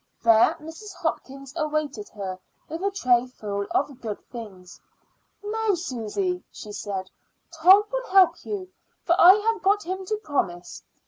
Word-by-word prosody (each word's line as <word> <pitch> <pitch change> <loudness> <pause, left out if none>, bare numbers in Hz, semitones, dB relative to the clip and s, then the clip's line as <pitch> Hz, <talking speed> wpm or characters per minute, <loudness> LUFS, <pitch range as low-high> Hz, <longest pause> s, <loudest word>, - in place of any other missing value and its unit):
There 225 -1 +5
Mrs. 330 +6 -10
Hopkins 275 -5 -4
awaited 305 -8 -2
her 190 -2 -5 0.3
with 325 +3 -6
a 400 - +1
tray 250 -10 +2
full 200 -5 -5
of 275 -3 -1
good 215 -3 -4
things. 195 -7 -10 0.6
"Now, 430 -1 0
Susy," 355 - -3
she 210 - -9
said, 195 -2 -5 0.4
"Tom 365 +5 +6
will - - -3
help 380 -2 +5
you, 380 -3 -5 0.3
for 340 - +3
I 360 +1 +10
have 435 0 0
got 405 +2 +2
him 375 +2 -4
to 430 - -1
promise. 180 - -3
305 Hz, 145 wpm, -25 LUFS, -, 0.6 s, I